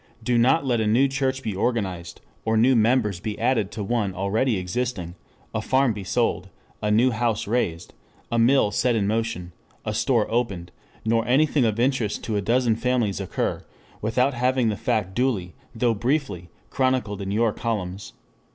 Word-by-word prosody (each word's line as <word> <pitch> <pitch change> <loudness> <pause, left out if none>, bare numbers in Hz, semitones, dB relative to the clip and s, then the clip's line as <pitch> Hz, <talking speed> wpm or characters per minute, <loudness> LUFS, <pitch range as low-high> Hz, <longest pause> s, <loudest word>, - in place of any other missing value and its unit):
Do 120 +2 +1
not 135 +6 +3
let 120 -4 +1
a 110 - 0
new 120 +6 +4
church 135 -1 -1
be 110 -5 -3
organized, 95 -6 -2 0.2
or 110 0 +1
new 125 +4 +4
members 110 -4 +2
be 105 +3 -4
added 115 -4 +1
to 105 - -4
one 100 -3 -1
already 105 +5 0
existing, 90 -1 -3 0.4
a - - -1
farm 130 -2 +2
be 100 -2 -6
sold, 95 - -1 0.3
a 105 - 0
new 115 +5 +4
house 115 -1 -1
raised, 95 -7 -2 0.4
a 115 - +1
mill 120 -2 +4
set 120 +3 +1
in 105 -3 +1
motion, 105 -5 -2 0.3
a - - -2
store - - +2
opened, 100 -8 -1 0.3
nor 115 0 +2
anything 140 +1 +3
of 110 0 0
interest 120 -4 0
to 110 - -2
a 100 - +1
dozen 120 +2 +2
families 115 -4 0
occur, 95 - -2 0.4
without 125 +6 +1
having 125 -1 +1
the 105 - -1
fact 105 -5 -1
duly, 110 -9 -1 0.2
though 115 +1 +2
briefly, 115 - -2 0.2
chronicled 130 -6 0
in 95 - -4
your 110 +2 +1
columns. 100 -4 -4
115 Hz, 170 wpm, -24 LUFS, 100-125 Hz, 0.4 s, new